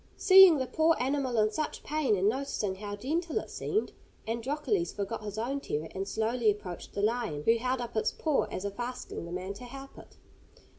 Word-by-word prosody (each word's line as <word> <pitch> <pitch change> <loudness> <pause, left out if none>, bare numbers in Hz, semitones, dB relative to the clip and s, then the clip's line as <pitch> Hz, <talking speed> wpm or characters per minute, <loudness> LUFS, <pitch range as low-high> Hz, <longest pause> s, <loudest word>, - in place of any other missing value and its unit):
Seeing 380 -4 +8
the 260 - -1
poor 320 +5 +3
animal 260 -1 0
in 215 0 +3
such 305 +8 -3
pain, 295 -7 +1
and 195 +1 +1
noticing 215 -5 -1
how 205 0 -5
gentle 320 - -2
it - - -4
seemed, 425 +2 -1 0.4
Androcles 295 - -1
forgot 210 +2 -4
his 205 0 -6
own 255 +5 -1
terror, 155 - -4
and 195 +1 -4
slowly 225 +1 +1
approached 190 -4 -4
the 200 - -1
lion, 215 -10 0
who 230 +5 +4
held 255 +2 -1
up 235 - -6
its 220 - +1
paw 310 -3 0
as 185 - -5
if 200 +3 -5
asking 245 -7 -5
the 170 - -8
man 185 +2 -4
to 205 - -11
help 270 +2 -10
it. - - -16
235 Hz, 200 wpm, -30 LUFS, 205-280 Hz, 0.4 s, Seeing